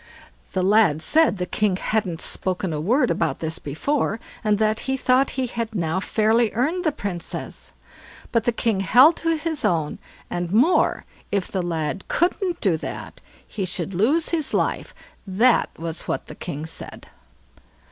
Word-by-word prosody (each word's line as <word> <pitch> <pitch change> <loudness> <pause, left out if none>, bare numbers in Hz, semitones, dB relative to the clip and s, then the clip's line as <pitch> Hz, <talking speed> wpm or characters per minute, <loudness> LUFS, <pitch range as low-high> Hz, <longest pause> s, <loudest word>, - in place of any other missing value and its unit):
The 185 - 0
lad 190 -6 +4
said 320 -9 +4
the 180 - -2
king 205 +1 +1
hadn't 185 -4 -1
spoken 185 -2 -1
a 150 - -2
word 245 - +2
about 160 -5 0
this 160 0 -3
before, 225 - -1 0.2
and 210 -1 +2
that 215 +1 +1
he 265 - +1
thought 260 +1 +3
he 260 - +1
had 230 -2 -4
now 165 -1 0
fairly 220 +3 +2
earned 310 +10 0
the 310 - +3
Princess; 200 - -6 0.6
but 230 -1 +1
the 240 - +3
king 225 -3 0
held 255 - +6
to 330 0 0
his 320 -1 -3
own; 160 -4 0 0.3
and 175 -1 -3
more, 255 - +3 0.3
if 200 -2 0
the 190 - -1
lad 165 +1 -3
couldn't 355 +1 0
do 185 -6 +2
that - - -7 0.3
he 200 - -4
should 185 +1 -3
lose 265 - +2
his 320 -3 0
life; - - -1 0.3
that 225 +6 +3
was 165 0 -6
what - - -2
the - - -9
king 155 -3 -6
said. 160 - -8
210 Hz, 165 wpm, -23 LUFS, 175-255 Hz, 0.6 s, held